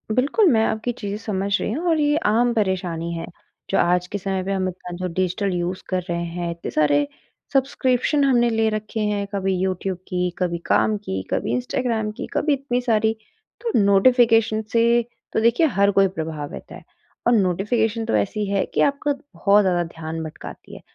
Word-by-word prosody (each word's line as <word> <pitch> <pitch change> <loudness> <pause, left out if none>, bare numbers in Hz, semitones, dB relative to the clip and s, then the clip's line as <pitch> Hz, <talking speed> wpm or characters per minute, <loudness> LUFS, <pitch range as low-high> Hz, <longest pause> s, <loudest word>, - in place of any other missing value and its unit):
बिल्कुल, 295 - +3
मैं 220 -1 +3
आपकी 220 +2 -1
चीज़ें 205 -1 -3
समझ 200 -3 -3
रही - - -2
हूँ 330 +8 -2
और 320 -2 +2
ये 295 +1 +2
आम 235 +3 +3
परेशानी 180 -5 -1
है। 165 0 -4 0.4
जो 195 - +1
आज 180 +1 +2
के 205 - -4
समय 190 -1 -2
पे 195 - -3
हम 190 -1 0
इतना 180 -1 -8
जो 185 0 -3
डिजिटल 185 +2 -1
यूज़ 175 +1 -2
कर 185 -1 0
रहे 170 0 -1
हैं, 170 0 -4
इतने 170 - -6
सारे 145 -1 +2 0.5
सब्सक्रिप्शन 270 +1 +1
हमने 240 -3 +3
ले 225 -1 +1
रखे 215 +1 -4
हैं, 210 -1 0
कभी 195 -1 0
यूट्यूब 190 0 -2
की, 180 -1 -1
कभी 175 -2 -1
काम 215 - +2
की, 95 - -4
कभी 115 - -1
इंस्टाग्राम 220 - -1
की, - - -7
कभी 295 0 +2
इतनी 260 -3 -1
सारी, 220 -2 +2 0.5
तो 465 -2 -2
नोटिफ़िकेशन 225 +2 +4
से 235 +1 +4 0.3
तो - - +2
देखिए 235 +8 +4
हर 200 -5 +2
कोई 195 0 +4
प्रभावित 160 -5 -6
है। - - -9 0.5
और 240 - +5
नोटिफिकेशन 220 +3 +1
तो - - 0
ऐसी 205 - 0
है 200 -1 +1
कि - - +2
आपका 285 +1 +1
बहुत 210 -7 +2
ज़्यादा 175 -2 +1
ध्यान 160 0 -6
भटकाती 155 - -9
है। - - -11
200 Hz, 185 wpm, -22 LUFS, 180-235 Hz, 0.5 s, और